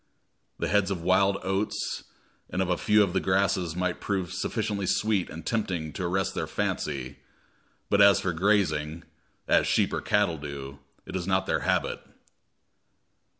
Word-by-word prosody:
The - - -1
heads 100 -1 +2
of 90 -4 -3
wild 95 +2 +3
oats 95 +2 -2 0.4
and 90 - -3
of 95 -1 +1
a 90 - +1
few 105 0 +4
of 90 -3 -2
the 95 - +2
grasses 95 -3 +1
might 90 0 -2
prove 95 -3 -2
sufficiently 100 0 -2
sweet 105 -2 +1
and 80 +1 -9
tempting 95 -9 -2
to 90 - -4
arrest 95 +2 0
their - - -3
fancy; 70 -2 -3 0.7
but 100 - +3
as 100 -1 +7
for 90 - -1
grazing, 85 -4 +1 0.4
as - - +4
sheep - - +2
or - - -1
cattle 100 -6 +1
do, 70 -1 -7 0.3
it - - -7
is 90 -1 -3
not 95 0 +2
their - - 0
habit. - - 0
95 Hz, 160 wpm, -27 LUFS, 85-100 Hz, 0.7 s, as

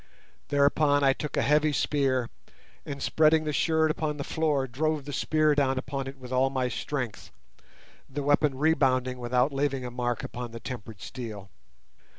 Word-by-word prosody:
Thereupon 145 0 +3
I 135 -1 +5
took 150 +1 -5
a - - +2
heavy 150 +1 +3
spear, 135 -4 0 0.6
and, 140 -1 -5
spreading 155 0 +4
the 150 -1 -2
shirt 160 +1 +2
upon 155 -1 -2
the 140 - -3
floor, 150 -4 0
drove 145 +3 -1
the 145 - -6
spear 155 0 +2
down 135 -2 +1
upon 135 +1 -3
it 135 +1 -7
with 130 -1 -11
all 130 +1 +3
my 130 -2 -1
strength, 125 -1 -4 0.8
the 140 +2 -4
weapon 145 -1 +2
rebounding 130 -4 +2
without 125 +3 +1
leaving 135 -2 -1
a 125 - -5
mark 120 -1 -2
upon 120 -1 -6
the 115 - -6
tempered 110 -4 -8
steel. 105 -6 -7
135 Hz, 165 wpm, -27 LUFS, 125-150 Hz, 0.8 s, I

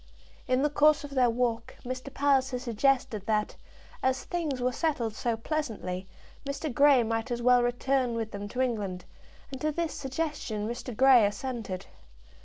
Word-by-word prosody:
In 255 +1 +2
the 295 - +3
course 295 0 +4
of 290 - -8
their 255 -3 +3
walk 230 -1 -1
Mr. 255 +2 -5
Palliser 270 -2 +2
suggested 240 -3 0
that, 210 -1 0 0.5
as 260 0 +1
things 320 -7 -2
were 250 +1 +1
settled 250 -6 -1
so 230 +1 -1
pleasantly, 220 - -3 0.4
Mr. 280 0 -4
Grey 280 -1 +6
might 225 +2 -2
as 240 -1 -3
well 250 0 +6
return 245 0 0
with 225 -1 -3
them 205 0 -5
to 250 +5 -3
England, 205 -8 -2 0.5
and 265 - -7
to 305 - +1
this 335 +1 -2
suggestion 265 -7 -3
Mr. 240 -1 -5
Grey 260 -3 +7
assented. 205 -4 -5
250 Hz, 160 wpm, -29 LUFS, 225-275 Hz, 0.5 s, Grey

